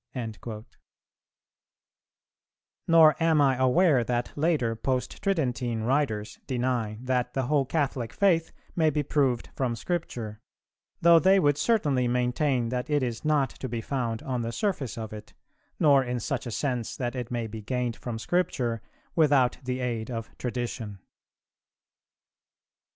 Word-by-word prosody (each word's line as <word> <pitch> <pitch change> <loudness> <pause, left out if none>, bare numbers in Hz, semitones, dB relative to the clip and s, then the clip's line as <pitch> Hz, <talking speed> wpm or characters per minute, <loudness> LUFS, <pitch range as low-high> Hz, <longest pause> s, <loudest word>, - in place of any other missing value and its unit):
'"[342:2] 110 -2 -6 2.2
Nor 160 -2 +7
am 165 -2 +4
I 135 -2 +4
aware 130 +1 +4
that 120 +1 -2
later 145 -7 +1
Post 130 +2 -2
tridentine 125 - -1
writers 115 -6 0
deny 120 -4 -1
that 125 -1 -1
the 135 - +1
whole 140 +2 +2
Catholic 135 -7 -1
faith 170 -5 +2 0.2
may 160 -2 +3
be 150 0 0
proved 135 -5 0
from 125 -3 -1
Scripture, 115 -7 -4 0.6
though 170 0 +7
they 190 +3 +5
would 145 -4 +3
certainly 145 - +1
maintain 125 0 +1
that 125 +2 -3
it 145 -2 +2
is 120 -3 -3
not 150 -4 +2
to 130 - -7
be 115 0 -3
found 115 -2 -3
on 125 -2 -2
the 115 0 -3
surface 140 - -2
of 110 -2 -6
it, 105 0 -10 0.4
nor 140 -4 +5
in 125 -1 -2
such 130 +2 -3
sense 120 0 -2
that 120 0 -3
it 125 -2 -4
may 120 -2 -2
be 110 0 -7
gained 125 +1 -2
from 120 -2 -5
Scripture 125 - -1 0.3
without 145 -6 +3
the 130 0 -3
aid 115 -2 -2
of 115 -2 -6
Tradition. 120 -4 -4
125 Hz, 140 wpm, -27 LUFS, 115-145 Hz, 2.2 s, Nor